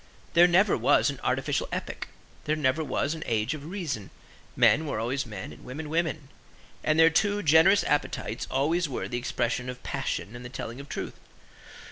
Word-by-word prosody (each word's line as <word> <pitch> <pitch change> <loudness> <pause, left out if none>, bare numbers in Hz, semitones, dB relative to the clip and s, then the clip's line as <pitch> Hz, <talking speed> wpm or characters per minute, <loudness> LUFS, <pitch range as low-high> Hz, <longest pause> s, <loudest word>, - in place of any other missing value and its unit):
There 175 +1 +7
never 185 +3 +4
was - - +3
an - - -9
artificial - - 0
epoch. - - -4 0.4
There 150 - +1
never 150 +1 +1
was 150 0 -1
an 160 - -7
age 115 +4 0
of 150 -1 -7
reason. 160 - -4 0.5
Men 155 +2 +4
were 140 - -2
always 125 +3 -1
men 105 -4 -7
and - - -15
women 150 +4 -6
women: 160 -3 -1 0.5
and 155 0 +2
their 165 0 +7
two 205 +4 +1
generous 160 +6 +6
appetites 145 -6 -1
always 155 +5 +1
were 130 - -3
the 120 - -3
expression 125 +1 -2
of 125 0 -8
passion 105 +4 -3
and 120 - -8
the 120 - -7
telling 120 0 -6
of 140 +1 -10
truth. - - -5
150 Hz, 180 wpm, -27 LUFS, 125-160 Hz, 0.5 s, There